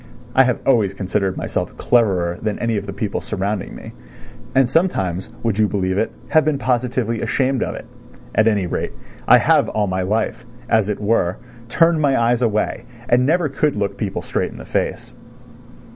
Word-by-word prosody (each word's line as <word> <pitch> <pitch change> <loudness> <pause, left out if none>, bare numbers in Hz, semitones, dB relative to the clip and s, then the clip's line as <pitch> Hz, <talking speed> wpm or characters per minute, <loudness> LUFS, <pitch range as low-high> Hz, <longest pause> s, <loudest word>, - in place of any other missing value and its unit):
(I 130 - +6
have 125 -1 0
always 110 -7 +3
considered 95 0 -1
myself - - -3
cleverer 95 -8 +2
than 110 -1 -2
any 115 -1 -1
of 100 0 -4
the - - -4
people 100 +1 -3
surrounding 100 +1 -3
me, - - -9 0.6
and 135 -1 +5
sometimes, 95 - 0
would 110 -3 0
you 105 - +4
believe 95 -2 -1
it, - - 0 0.2
have 155 - +4
been 155 -2 +1
positively 125 -3 -1
ashamed 135 -1 0
of - - -2
it. - - -8 0.5
At 110 - +3
any 105 -4 +2
rate, 85 - -3 0.3
I - - +8
have - - +3
all 105 -1 0
my 95 -1 -1
life, 110 +5 -1 0.2
as 110 -3 +2
it 105 - -2
were, 100 -4 +1 0.3
turned 165 +4 +3
my 140 -4 +3
eyes 120 +1 +2
away 110 0 0 0.2
and 125 +2 +4
never 170 +1 +2
could 145 +1 0
look 100 -1 -2
people 100 -2 -3
straight - - -2
in - - -12
the - - -9
face.) - - -2
110 Hz, 185 wpm, -20 LUFS, 100-125 Hz, 0.6 s, I